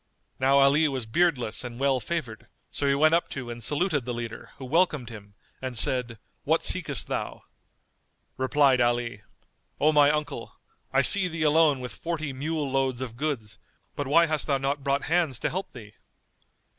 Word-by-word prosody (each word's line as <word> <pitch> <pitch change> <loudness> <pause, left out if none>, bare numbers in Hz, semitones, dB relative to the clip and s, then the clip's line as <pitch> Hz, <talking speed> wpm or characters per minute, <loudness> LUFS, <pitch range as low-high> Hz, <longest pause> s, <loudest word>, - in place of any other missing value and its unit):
Now 135 +1 +3
Ali 140 +3 +4
was 130 -5 -3
beardless 125 -4 0
and 120 -1 -8
well 135 -1 +2
favoured; 125 -9 -5 0.2
so 145 - -2
he 140 - +3
went 155 +3 +4
up 170 - +1
to 125 -3 -6
and 120 0 -7
saluted 145 - 0
the 120 0 -4
leader 115 -1 -7
who 135 - -8
welcomed 150 -4 +1
him 100 -2 -12 0.3
and 130 -2 -4
said, 120 0 +1 0.3
"What - - +1
seekest - - 0
thou?" - - -5 0.9
Replied 130 -1 +3
Ali, 120 -3 0 0.6
"O 155 +2 +4
my 145 -1 +5
uncle, 150 0 -3 0.4
I - - +3
see 195 -3 +6
thee 165 -2 -3
alone 150 -3 +3
with 125 -5 -6
forty 155 - -4
mule 150 +2 -3
loads 135 -2 0
of 120 -3 -6
goods; 120 -6 -4 0.4
but 145 - -3
why 165 +5 +5
hast 155 -2 -1
thou 140 -2 +2
not 135 +1 -2
brought 140 0 0
hands 165 -5 0
to - - -2
help 190 +3 -4
thee?" 105 -5 -12
140 Hz, 175 wpm, -26 LUFS, 120-155 Hz, 0.9 s, see